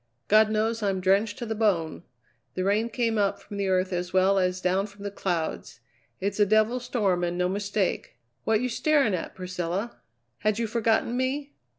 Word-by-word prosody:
God 215 +1 +5
knows 220 +1 0
I'm 195 -2 0
drenched 200 +3 +2
to 240 - -5
the 220 - -2
bone. 195 -8 0 0.5
The 185 - -1
rain 210 +4 +1
came 230 -2 0
up 200 -1 +1
from 205 - -9
the 200 -1 -1
earth 185 0 +1
as 180 0 -2
well 190 +1 +3
as 180 0 0
down 185 +2 +1
from 200 0 -14
the 200 - -4
clouds. 175 -5 -3 0.4
It's 200 +2 -2
a 205 - +6
devil's 215 +4 +2
storm 195 -8 0
and 175 0 -1
no 180 0 +1
mistake. 200 0 -2 0.3
What 220 0 +2
you 250 - 0
staring 275 -2 +2
at, 180 - -4
Priscilla? 180 +4 -4 0.4
Had 215 -1 +1
you 230 - 0
forgotten 225 +1 +1
me? 275 +3 -2
205 Hz, 190 wpm, -26 LUFS, 185-225 Hz, 0.5 s, a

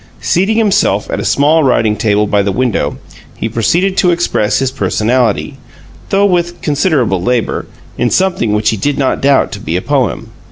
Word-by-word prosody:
Seating 195 +6 0
himself 210 -2 +1
at - - -2
a - - -3
small 155 +3 +2
writing 115 -5 +2
table 105 0 +1
by 105 0 +1
the 100 0 -1
window, 125 +1 -1 0.4
he - - -3
proceeded 170 - 0
to 180 - +3
express 115 -11 0
his 135 -1 -1
personality 120 -3 -1 0.5
though 200 +1 +2
with 175 -2 0
considerable 145 - 0
labor 120 +4 -1 0.3
in 120 - +1
something 180 - 0
which 105 0 +1
he 110 - -3
did 140 +7 -1
not 135 -2 0
doubt 140 0 +2
to - - -6
be - - -4
a - - -2
poem. - - -1
130 Hz, 175 wpm, -13 LUFS, 110-175 Hz, 0.5 s, to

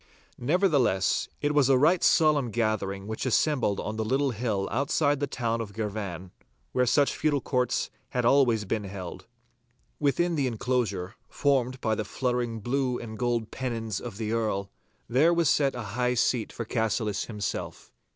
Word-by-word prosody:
Nevertheless, 140 - +2
it 145 0 +2
was 145 -3 +4
a 135 - +6
right 160 +6 +3
solemn 150 -6 +4
gathering 105 -4 -1
which 110 +1 -4
assembled 130 -5 +1
on 110 +1 -4
the 110 - 0
little 135 +4 +1
hill 105 -4 -1
outside 145 +2 +1
the 145 - -1
town 115 -3 -2
of 105 -3 -7
Girvan, 100 -5 -4 0.4
where 125 0 +2
such 140 +3 +3
feudal 150 -2 +1
courts 125 -2 -1 0.2
had 125 -3 -1
always 120 -5 +4
been 105 +1 -2
held. 95 -3 -7 0.7
Within 170 +4 +1
the 140 -5 +1
enclosure, 110 -6 -1 0.2
formed 130 -3 +1
by 110 - +1
the 110 - -1
fluttering 120 0 -2
blue 125 +2 0
and 110 -2 -7
gold 120 -1 -1
pennons 115 -5 -3
of 115 -5 -7
the 110 -1 -3
Earl, 105 -4 -1 0.4
there 150 +9 +4
was 170 -3 +3
set 140 -3 +2
a 120 - -4
high 125 +1 +1
seat 120 -1 +1
for 115 - -5
Cassillis 110 -3 -1
himself. 105 -3 -5
120 Hz, 160 wpm, -27 LUFS, 110-135 Hz, 0.7 s, a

